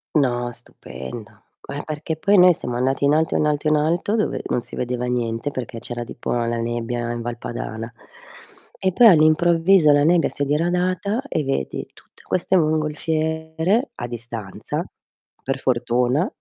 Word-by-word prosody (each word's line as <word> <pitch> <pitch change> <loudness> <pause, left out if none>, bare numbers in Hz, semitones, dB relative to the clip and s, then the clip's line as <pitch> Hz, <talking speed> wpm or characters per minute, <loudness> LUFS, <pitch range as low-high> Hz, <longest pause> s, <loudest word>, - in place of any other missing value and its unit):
No, 120 -4 +1
stupendo. 105 - -10 0.3
Eh, 145 - -4
perché 155 +1 -4
poi 200 +5 +3
noi 180 -1 +8
siamo 125 -5 -5
andati 135 +2 +1
in 145 - +4
alto, 160 +1 +1
in 150 - +2
alto, 150 0 0
in 155 - +4
alto 170 +8 +1
dove 215 - 0
non 125 - 0
si - - -10
vedeva 125 0 -2
niente 120 +2 -2
perché 120 -3 -6
c'era 120 0 -5
tipo 120 - -6
la 120 -1 0
nebbia 120 0 -2
in 120 0 -4
Val 120 0 -4
Padana, 115 0 -6 0.9
e 190 -1 +2
poi 240 - +5
all'improvviso 165 0 +5
la 145 0 +4
nebbia 170 +1 +3
si - - -7
è - - +3
diradata 180 - 0
e 155 - -1
vedi 135 - -2
tutte - - -20
queste 185 +1 +1
mongolfiere, 160 - 0
a 120 - -5
distanza, 115 -4 -5 0.6
per 135 0 -2
fortuna. 125 - +1
145 Hz, 160 wpm, -22 LUFS, 120-160 Hz, 0.9 s, noi